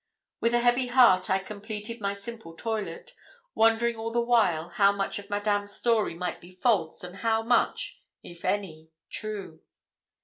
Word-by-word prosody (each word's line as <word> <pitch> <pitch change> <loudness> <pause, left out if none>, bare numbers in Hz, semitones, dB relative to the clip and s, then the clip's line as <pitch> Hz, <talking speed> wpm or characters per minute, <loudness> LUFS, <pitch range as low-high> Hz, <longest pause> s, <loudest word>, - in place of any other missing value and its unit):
With 235 +1 +2
a 240 - +3
heavy 245 +1 +3
heart 240 -8 +5
I 190 - +4
completed 210 +3 -6
my 200 0 -1
simple 200 -4 -9
toilet, 225 - -4 0.4
wondering 225 +1 +3
all 225 +1 -4
the 235 - +1
while 220 -9 +2
how 200 +3 +4
much 200 0 -2
of 200 0 -12
Madame's 205 0 -1
story 230 -7 +1
might 180 0 -4
be 180 +1 -15
false 185 -7 +1
and 180 +1 -8
how 225 0 +1
much, 235 +1 +1 0.2
if 170 -1 -12
any, 160 -6 -2 0.2
true. 205 -7 -5
210 Hz, 160 wpm, -27 LUFS, 190-230 Hz, 0.4 s, heart